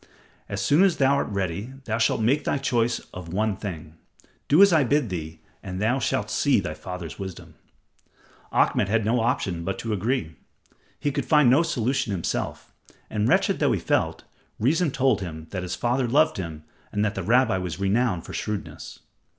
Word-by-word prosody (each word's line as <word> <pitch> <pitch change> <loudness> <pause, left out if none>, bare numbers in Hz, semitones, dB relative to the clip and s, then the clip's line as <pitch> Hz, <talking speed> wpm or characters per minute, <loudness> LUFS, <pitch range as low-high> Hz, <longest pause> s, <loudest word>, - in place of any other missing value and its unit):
"As - - -3
soon 145 +5 +4
as 195 -4 +3
thou 135 0 +4
art 140 - 0
ready, 100 +4 -3
thou 110 +1 -1
shalt 115 - +2
make 135 +7 +2
thy - - 0
choice 120 -3 +1 0.2
of 90 -3 -8
one 105 +2 0
thing. 80 -5 -7 0.5
Do 155 +8 +7
as 200 -3 +5
I 155 -3 +5
bid 140 -2 +1
thee, 80 -3 -6 0.2
and 95 -2 -6
thou 115 +6 +1
shalt 115 - -1
see - - +3
thy - - -4
father's 90 -3 -7
wisdom." 95 -3 -8 1.0
Ahmed 100 - +2
had 110 0 +1
no 120 +3 +2
option 95 -7 -1
but 95 +2 -3
to 115 -2 -3
agree. 100 - -2 0.6
He 145 - 0
could 140 -1 -3
find 150 -5 +5
no 140 +6 +5
solution 130 -7 -1
himself, 85 -4 -3 0.4
and 105 0 0
wretched - - +2
though - - +3
he - - 0
felt, - - 0 0.3
reason 155 +9 +2
told 130 -4 +1
him 80 -4 -6
that 95 - -3
his 90 0 -4
father 125 +1 0
loved 150 +4 +3
him 80 -5 -6 0.3
and 105 +1 0
that 105 - -1
the - - -4
rabbi 115 -3 +3
was 90 -2 -5
renowned 100 -2 +1
for - - -9
shrewdness. 105 -2 -5
110 Hz, 185 wpm, -25 LUFS, 95-130 Hz, 1.0 s, Do